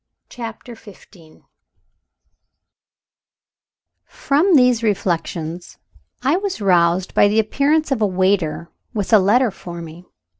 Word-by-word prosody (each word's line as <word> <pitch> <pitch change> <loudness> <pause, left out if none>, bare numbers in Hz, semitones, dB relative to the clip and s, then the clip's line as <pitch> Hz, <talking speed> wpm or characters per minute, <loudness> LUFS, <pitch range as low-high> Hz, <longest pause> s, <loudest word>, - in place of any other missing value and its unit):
CHAPTER 235 0 -9
XV 195 -6 -17 2.6
From 320 +6 +1
these 250 -4 +4
reflections 175 -5 -3 0.5
I 280 +6 +2
was 390 - -4
roused 180 -2 +1
by - - +4
the 210 +2 0
appearance 285 +8 +1
of 255 -5 -1
a 210 - +3
waiter, 185 -3 -1 0.2
with 205 +1 -2
a 215 - +8
letter 220 +5 +2
for 175 -2 -10
me. 165 +2 -11
205 Hz, 110 wpm, -19 LUFS, 175-250 Hz, 2.6 s, a